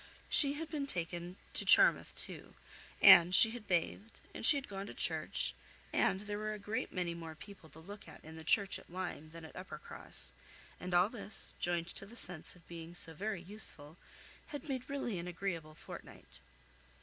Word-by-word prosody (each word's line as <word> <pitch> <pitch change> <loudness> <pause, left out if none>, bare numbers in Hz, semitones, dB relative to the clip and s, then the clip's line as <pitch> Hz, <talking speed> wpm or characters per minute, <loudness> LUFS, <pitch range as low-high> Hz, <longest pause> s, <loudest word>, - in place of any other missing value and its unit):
She 280 -2 +3
had 320 +2 -5
been 295 -3 -3
taken 175 -2 -3 0.2
to - - +2
Charmouth - - +6
too, - - -4 0.5
and 185 -2 +9
she 225 - +7
had 230 -3 -9
bathed, 190 +5 -1
and - - -7
she 285 - +6
had 275 - -5
gone 195 0 -6
to - - -9
church, - - +1 0.4
and 195 - +2
there 205 0 -4
were 215 0 -2
a - - -5
great 210 +2 -3
many 175 -2 -2
more 165 -1 -8
people 165 0 -13
to 160 - -14
look 200 +5 -11
at - - -13
in 160 0 -10
the 160 - -9
church 200 +4 +3
at - - -18
Lyme 175 -3 -5
than 165 0 -10
at 160 - -13
Uppercross; 175 -5 -6 0.5
and 180 0 -3
all 175 +2 +6
this, 210 -4 +4
joined 175 -1 -1
to 195 - -6
the 235 +3 -12
sense 175 -6 0
of 175 - -20
being 170 0 -9
so 165 -2 -4
very 200 +1 -4
useful, 180 -6 -2 0.5
had 290 +1 -7
made 260 -3 -4
really 245 -9 -2
an 170 - -6
agreeable 170 -3 -4
fortnight. 65 - -11
185 Hz, 190 wpm, -35 LUFS, 165-210 Hz, 0.5 s, and